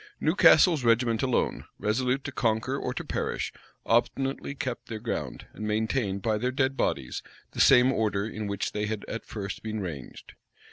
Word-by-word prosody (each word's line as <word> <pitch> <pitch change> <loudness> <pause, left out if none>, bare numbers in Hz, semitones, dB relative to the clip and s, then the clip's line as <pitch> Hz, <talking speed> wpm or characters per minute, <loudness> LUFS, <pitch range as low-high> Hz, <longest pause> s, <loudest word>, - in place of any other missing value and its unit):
Newcastle's 165 -8 +5
regiment 115 -1 +3
alone, 130 -2 0
resolute 125 +5 0
to 140 - -5
conquer 115 +1 0
or 125 - -2
to 125 - -4
perish, - - -2 0.3
obstinately 135 +4 0
kept 130 -3 -4
their 110 - -5
ground, 115 +2 -4
and 105 - -5
maintained, 105 -2 -1
by 110 -2 +1
their 125 +3 0
dead 130 0 +1
bodies, 65 - -1 0.3
the - - -1
same 125 -1 +7
order 105 -3 0
in 110 -1 -5
which 100 -1 -2
they 105 0 -2
had 110 -1 -4
at 115 - -6
first 100 -3 -5
been 110 -1 -4
ranged. 80 -10 -7
115 Hz, 170 wpm, -27 LUFS, 105-130 Hz, 0.3 s, same